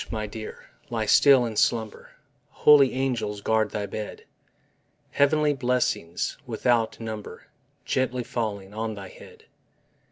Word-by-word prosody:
my 110 -1 -3
dear, 110 +1 -9 0.2
lie 115 -2 -2
still 130 +3 +6
and 110 -3 -2
slumber, 110 -3 -1 0.4
Holy 145 -3 +5
angels 125 -6 -2
guard 110 +1 +1
thy 105 -1 -3
bed! 105 +1 -7 0.9
Heavenly 150 +1 +3
blessings 125 -10 -1
without 115 -1 0
number 110 -2 -7 0.4
Gently 130 -1 -1
falling 105 -5 -4
on 110 0 -3
thy 100 -2 -9
head. - - -15
115 Hz, 120 wpm, -25 LUFS, 105-125 Hz, 0.9 s, still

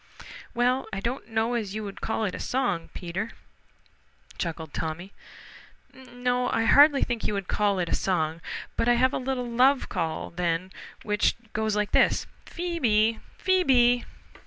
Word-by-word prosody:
"Well, 250 +2 +1
I 195 - -3
don't 235 +1 -4
know 225 +1 0
as 215 -4 -2
you 215 - -3
would 200 -1 -8
call 220 0 -1
it 190 - -2
a - - -6
song, 250 -10 -1
Peter," 185 +5 -4 1.1
chuckled 160 -3 -4
Tommy. 175 +5 -4 0.8
"No, 250 -1 -2
I 225 - +1
hardly 285 +4 +6
think 235 -3 -2
you 210 - -1
would 195 -2 -3
call 205 -2 +1
it 175 -2 -1
a - - -1
song. 165 -3 0 0.3
But 230 - +1
I 240 - +5
have 260 +3 +3
a - - -1
little 255 -1 -2
love 255 +3 +3
call 160 -1 -3
then 175 +1 -1 0.3
which 210 -1 +1 0.2
goes 215 -1 0
like 210 -1 0
this: - - +3 0.2
Phoe 345 -1 -4
be! 220 -3 +3 0.2
Phoe 375 0 +2
be!" 245 -5 +4
225 Hz, 165 wpm, -26 LUFS, 195-250 Hz, 1.1 s, hardly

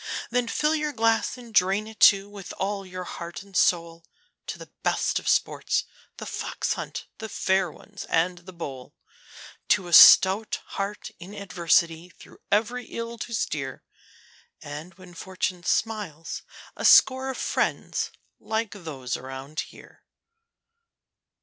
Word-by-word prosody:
Then 245 0 +1
fill 300 +6 +1
your 300 -1 -1
glass, 225 +1 +1
and 240 -2 -13
drain 195 +1 +3
it, 220 0 -12
too, 195 0 +6
with 205 -2 -9
all 195 0 -3
your 185 0 -6
heart 170 +1 -7
and 200 -1 -18
soul, 170 -2 +1 0.4
To - - -5
the - - -12
best - - +1
of - - -3
sports - - +1 0.3
The - - -7
Fox - - -3
hunt, - - -6
The 220 - -6
Fair 190 -3 +1
Ones, 205 +5 -11
and 175 +2 +1
The 180 +2 -12
Bowl, 135 -7 -8 0.7
To 185 - +2
a 175 - -6
stout 195 +5 +8
heart 200 +1 -4
in 185 +4 -10
adversity 170 -3 +1
through - - -17
every 235 +4 +1
ill 230 0 -6
to 235 - -6
steer, 140 - -3 0.8
And 155 +4 -8
when 185 -1 -14
Fortune 185 +1 -3
smiles 200 -8 -2 0.3
a - - -7
score 260 0 +6
of 260 - -4
friends - - -1 0.3
like 220 -1 -2
those 145 -10 -5
around 135 +4 -7
us - - -1
here. - - -16
190 Hz, 145 wpm, -26 LUFS, 170-220 Hz, 0.8 s, stout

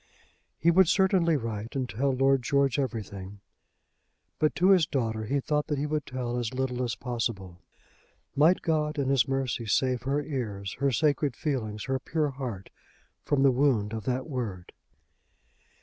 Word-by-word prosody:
He 170 - +3
would 185 +1 +5
certainly 185 -4 +3
write 115 0 -5
and 130 -2 -1
tell 135 +4 0
Lord 135 +1 +3
George 140 +1 +1
everything. 100 -6 -4 1.0
But 155 - +2
to 185 +2 +4
his 180 -5 +5
daughter 110 -6 -2
he 140 +6 0
thought 150 +2 -1
that 150 -2 -1
he 140 - -1
would 150 0 -2
tell 125 -2 -3
as 120 +1 -3
little 130 -1 -1
as 120 - -2
possible. 115 -7 -4 0.7
Might 160 +6 +4
God 155 -2 0
in 140 -2 0
his 135 -5 +3
mercy 130 -3 -2
save 125 +4 +1
her 140 +3 -1
ears, 105 -10 -4
her 140 0 +2
sacred 145 0 +1
feelings, 110 -8 -3
her 135 0 -1
pure 150 +2 -1
heart 125 -8 -6 0.5
from 140 -2 +2
the 135 - +6
wound 120 -6 +1
of 110 -3 -5
that 130 +2 -1
word! 115 - -5
130 Hz, 165 wpm, -28 LUFS, 115-145 Hz, 1.0 s, the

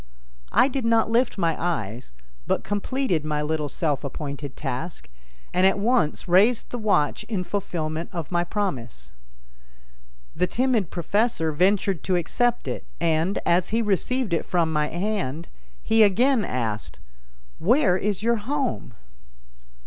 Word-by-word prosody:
I - - +5
did 270 -1 -3
not 230 -1 +2
lift 235 0 +2
my 165 -4 +1
eyes, 120 - -3 0.4
but - - 0
completed 205 - -1
my 150 -1 -1
little 150 -1 -1
self 150 -3 -1
appointed 140 0 -6
task, 160 - -4 0.5
and 180 - +2
at 195 - +2
once 215 -6 +1
raised 205 +7 +3
the 245 - -4
watch 200 -9 +1
in 205 -5 -2
fulfillment 165 -4 -3
of 170 -4 -5
my 175 0 +2
promise. 125 - -4 1.2
The 180 - +1
timid 240 -7 +1
professor 175 -1 0
ventured 190 +2 +2
to 185 - +1
accept 235 +8 0
it - - -4 0.2
and, 165 +3 +1
as 175 +1 +2
he 230 +2 +1
received 215 +2 0
it 165 - +1
from 165 -3 0
my 150 -1 +1
hand, 175 -4 -3 0.4
he 225 0 +3
again 230 +4 +4
asked: 115 - -3 0.6
"Where 215 - +3
is 200 +1 -1
your 235 +1 +2
home?" 255 - -3
180 Hz, 140 wpm, -24 LUFS, 155-220 Hz, 1.2 s, I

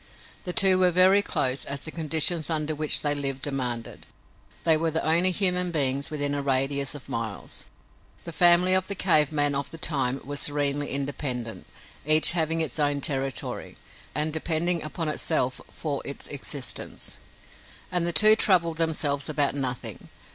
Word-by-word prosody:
The 180 - -2
two 190 -2 +4
were 180 -1 +4
very 185 +3 +5
close, 130 -9 -1
as 140 0 -4
the 155 - -7
conditions 160 0 0
under 155 -1 -2
which 155 0 0
they 145 -1 +2
lived 135 -2 -2
demanded. 125 -5 -4 0.6
They 165 -1 +5
were 165 +1 -1
the 160 +1 -2
only 170 +4 +4
human 180 -1 +2
beings 140 -4 0
within 145 -2 -2
a 145 - -1
radius 140 +1 0
of 145 - -12
miles. 115 -3 -6 0.6
The 170 - -8
family 175 +2 +4
of 185 0 +1
the 200 - -3
cave 155 -6 +2
man 145 -1 +1
of 140 0 -3
the 165 - -10
time 135 -5 -1
was 145 +1 -4
serenely 145 0 -1
independent, 135 -4 -4 0.4
each 155 +1 +7
having 165 -1 0
its 155 -2 -3
own 145 -1 0
territory, 135 -2 -3 0.4
and 150 +1 +1
depending 165 +2 +1
upon 160 +2 -5
itself 135 -4 -1
for 145 -4 -5
its 140 - -7
existence. 140 -1 -4 0.7
And 175 -1 0
the - - +1
two 215 +5 +7
troubled 170 -7 +1
themselves 155 -3 -1
about 145 -2 +1
nothing. 130 -3 -4
150 Hz, 160 wpm, -25 LUFS, 140-170 Hz, 0.7 s, each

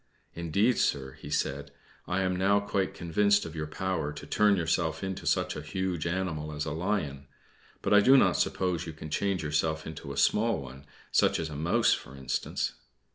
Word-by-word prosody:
"Indeed, 100 +9 +1
sir," 65 -2 0
he - - -9
said, 70 +1 -1 0.4
"I 95 +2 0
am 95 -1 0
now 100 +2 +3
quite 100 -1 -1
convinced 100 +4 +2
of 80 -1 -8
your 75 -1 -3
power 80 -2 -2
to 75 - -9
turn 105 -1 +3
yourself 80 -2 0
into 95 0 -4
such - - +1
a 75 - -5
huge 90 +1 -2
animal 85 -4 -2
as 75 0 -3
a 80 - -3
lion; 80 -5 -2 0.6
but - - +2
I 105 - +8
do 130 +6 +7
not - - +4
suppose 90 -3 0
you 80 - -5
can 80 0 -9
change 95 +1 0
yourself 80 +1 0
into 75 -3 -7
a 70 - -7
small 110 +11 +3
one 70 +1 -10 0.2
such - - +3
as 80 -1 -3
a - - -6
mouse, 80 +4 +3
for 65 - -6
instance?" 65 -1 -2
80 Hz, 190 wpm, -29 LUFS, 75-95 Hz, 0.6 s, I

